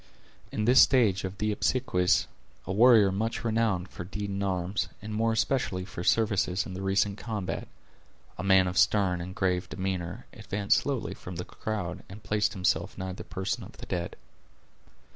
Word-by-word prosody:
In 105 - -1
this 125 +3 +7
stage 110 -8 +4
of 95 0 -5
the 105 +1 0
obsequies, 105 -5 +2 0.4
a 90 - -4
warrior 110 -2 +6
much 110 +4 -2
renowned 110 -5 0
for 90 - -7
deed 100 +2 -5
in 100 0 -3
arms, 95 0 -1
and 105 +1 -7
more 115 +1 +1
especially 110 -4 0
for 90 -2 -7
services 95 -1 +2
in 95 - -7
the 95 - -5
recent 100 +1 +1
combat, 105 -5 -4 0.7
a 95 - -6
man 95 -1 +5
of 90 +1 0
stern 95 -3 +3
and 95 +2 -7
grave 90 -1 0
demeanor, 95 +3 -4
advanced 100 -3 +1
slowly 135 -5 -3
from 90 - -9
the 90 - -5
crowd, 95 -4 -4
and 105 +2 -11
placed 105 0 +1
himself 95 -2 0
nigh 95 0 -4
the - - -8
person 95 0 -3
of - - -11
the - - -8
dead. 90 -2 -3
100 Hz, 175 wpm, -28 LUFS, 90-110 Hz, 0.7 s, this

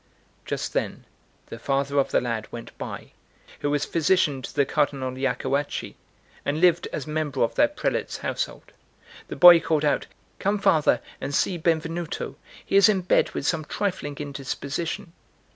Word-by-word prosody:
Just - - -3
then - - -2 0.4
the 115 - -9
father 140 +2 0
of 135 - +1
the - - +3
lad 115 -3 -3
went 115 -1 -9
by, - - -7 0.5
who 145 - -1
was 145 0 +1
physician 160 -4 +2
to - - -7
the 140 - +2
Cardinal 140 -3 0
Iacoacci, 135 +2 -2 0.5
and 145 +2 -1
lived 175 -1 +4
as 140 - -4
member 150 -2 -1
of 115 - 0
that 295 0 +2
prelate's - - -1
household. - - -4 0.6
The - - -6
boy 175 -1 +10
called 155 -2 0
out: 145 - +1 0.3
"Come, 200 +2 +1
father, 195 -7 +3 0.2
and 140 - -3
see 185 - +1
Benvenuto; 165 0 -2 0.3
he 195 - +2
is 200 +2 +7
in 195 -3 +2
bed 180 - +2
with - - -3
some 160 -2 +1
trifling 150 -5 -3
indisposition." 145 +4 -4
150 Hz, 160 wpm, -25 LUFS, 140-175 Hz, 0.6 s, boy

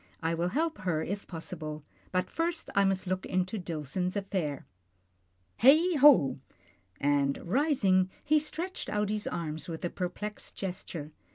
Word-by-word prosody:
I 165 +1 +1
will 170 +1 0
help 315 - -1
her 170 -5 0
if 200 +2 -4
possible, 155 -3 -6 0.3
but 185 0 +1
first 330 0 -1
I 200 0 +4
must 195 0 +1
look 185 +1 -1
into 185 +3 -1
Dillson's 175 +2 -2
affair. 185 -8 -2 1.0
Heigho! 280 - +6 0.3
" 90 +2 -34
and 140 -1 +2
rising, 195 - +3
he 305 +1 +4
stretched 340 +5 -5
out 210 -1 0
his 210 0 -2
arms 160 -3 -4
with 165 0 -4
a 175 - -2
perplexed 205 +3 -5
gesture. 175 -5 -5
185 Hz, 145 wpm, -30 LUFS, 160-215 Hz, 1.0 s, Heigho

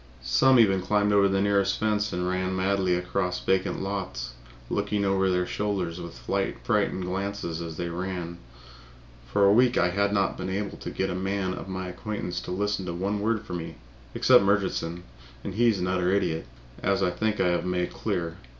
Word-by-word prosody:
Some 120 - +5
even 95 -4 +4
climbed 105 +2 +2
over 100 -1 +5
the 95 0 +1
nearest 100 -1 +2
fence 105 -1 +1
and 90 0 -1
ran 95 +1 -1
madly 95 -1 +1
across 90 0 -1
vacant 95 0 0
lots, 95 -9 -4 0.4
looking 100 0 0
over 95 -1 +2
their 90 -1 +1
shoulders 90 -4 -2
with 85 -7 -8
frightened - - -1
glances 95 -3 -3
as 80 -2 -6
they 85 - -2
ran. 85 0 -4 0.9
For 100 - +4
a 100 - +6
week 125 +2 +4
I 90 0 +3
had 100 +2 +1
not 100 -3 +1
been - - -3
able 100 +1 -3
to - - -5
get 95 - -2
any 90 - -3
man 95 -1 -1
of - - -7
my 95 0 -4
acquaintance 90 -1 -4
to - - -7
listen 100 0 -1
to 85 - -2
one 100 +4 -1
word 110 +1 0
from 90 - -4
me, 80 - -7 0.4
except - - +6
Murchison, 95 -4 0 0.4
and 100 - -4
he 120 +4 +3
is 110 -3 +3
an 90 - -1
utter 90 -1 +1
idiot, 80 -7 0 0.3
as - - +1
I 90 - +2
think 110 +4 -1
I 90 - +3
have 85 - +1
made 90 -1 -1
clear. 85 -6 -2
95 Hz, 195 wpm, -27 LUFS, 90-100 Hz, 0.9 s, a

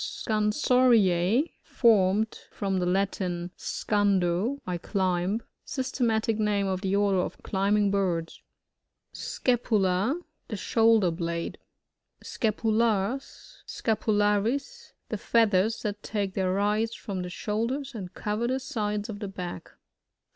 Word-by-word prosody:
SoANsoRTA' 220 - +2
— - - -42 0.2
Formed 215 -2 +4
from 195 -2 -1
the 180 - 0
Latin, 180 -2 -1
seandoj 205 +4 0
I 180 -1 -3
climb. 190 +3 0 0.2
Systematic 230 -4 0
name 205 -2 +1
of 190 -1 -1
the 195 -1 0
order 200 -2 +3
of - - -4
climbing 200 +1 +2
birds. 180 -5 -1 0.7
Scapula. 220 - +1
— - - -49
The 215 - -4
shoulder 225 -2 +3
blade. 170 0 -3 0.6
Scapulars 220 +2 -1
(Sksapolaries) 220 - 0
— - - -49
The - - -2
fbath 225 -3 +2
ers 200 +5 +2
that 205 -1 -3
take 200 -3 -2
their 190 -1 0
rise 210 +4 +1
from 195 -4 -5
the 180 - -5
shoulders, 230 +9 -2
and 190 -6 -6
cover 210 +3 -2
the 260 +2 0
sides 210 -6 -2
of 210 -3 -6
the 205 - -4
back. 180 -2 -6
210 Hz, 125 wpm, -27 LUFS, 190-225 Hz, 0.7 s, Formed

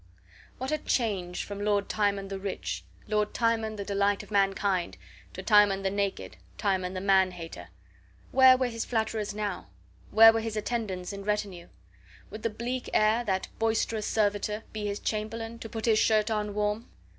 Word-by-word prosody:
What 260 +3 -4
a 305 - 0
change 195 -11 -1
from 205 0 -7
Lord 205 -1 +1
Timon 200 -2 0
the 195 -1 -4
rich, 195 0 -4 0.2
Lord 210 -1 0
Timon 225 -2 +1
the 200 -1 -5
delight 200 0 +1
of - - -16
mankind, 195 -2 +1 0.4
to - - -7
Timon 205 -3 +5
the 190 - 0
naked, 200 -1 -3 0.2
Timon 190 -3 -1
the - - -2
man 190 -1 +4
hater! 165 - -9 0.6
Where 260 0 +7
were 255 - +1
his 230 -1 -3
flatterers 220 -3 -2
now? 205 - -3 0.4
Where 225 +1 +8
were 225 - 0
his 220 -1 -4
attendants 210 -5 -3
and 200 0 -7
retinue? 200 -4 -2 0.6
Would 215 - -7
the 230 - 0
bleak 245 +4 -4
air, 215 +3 +3
that 190 -3 -1
boisterous 225 -1 0
servitor, 210 0 0
be 210 -1 -3
his 200 0 -3
chamberlain, 225 +2 -4
to 225 - -7
put 225 0 -4
his 220 -2 +4
shirt 220 0 +3
on 210 -1 -2
warm? 210 +2 -1
210 Hz, 170 wpm, -28 LUFS, 200-225 Hz, 0.6 s, Where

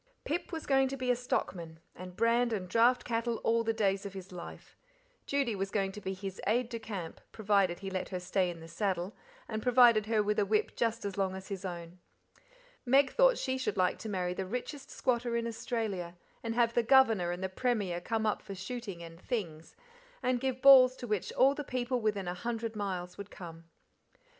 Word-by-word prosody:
Pip 340 +5 -2
was 325 -2 -5
going 270 -1 +3
to 275 +1 -4
be 255 -1 +1
a - - +3
stockman, 170 -9 -3 0.2
and 180 0 -9
brand 235 +2 +2
and 195 -5 -2
draft 235 +6 +3
cattle 230 0 -1
all 230 0 +2
the 225 - +1
days 200 -3 0
of 200 -1 -6
his 190 -1 -9
life. 180 -1 -10 0.5
Judy 275 -6 0
was 195 0 -2
going 195 -1 0
to 210 - -9
be 190 -1 -3
his 190 0 -6
"aide 235 +3 +1
de 230 -2 -4
camp", 195 -7 -6
provided 200 -4 +1
he 195 -1 -5
let 185 -1 -3
her 185 - -3
stay 180 +1 0
in 170 -1 -7
the 165 - -10
saddle, 185 +2 -2 0.3
and 220 - -3
provided 240 -3 +5
her 220 -2 +2
with 210 +1 0
a - - +4
whip 210 +2 0
just 230 -1 -1
as 200 -1 -4
long 190 -1 0
as 190 +1 -9
his 195 -2 -5
own. 175 -1 -7 0.8
Meg 265 +1 +4
thought - - +4
she 260 -1 -2
should 260 - -2
like 180 -1 +2
to 220 - -6
marry 180 -3 -1
the 190 +1 -4
richest 250 +6 -5
squatter 240 -2 0
in 230 - -1
Australia, 220 -6 -3 0.2
and 225 -1 -3
have 235 -1 +3
the 240 - +3
Governor 225 -7 +4
and 175 +2 -4
the - - +1
Premier 190 -4 -1
come 220 +3 -1
up 215 - 0
for 195 - -8
shooting 195 -2 -6
and 165 0 -11
"things," 170 -11 -4 0.5
and 250 -1 +1
give 260 -1 -2
balls 260 -2 +9
to 250 - -7
which 210 -5 -2
all 270 +2 +5
the 295 - -5
people 250 -1 -2
within 205 -4 -1
a 175 - -1
hundred 230 +3 -4
miles 185 -3 -4
would 200 0 -7
come. 165 -2 -10
215 Hz, 210 wpm, -31 LUFS, 185-240 Hz, 0.8 s, balls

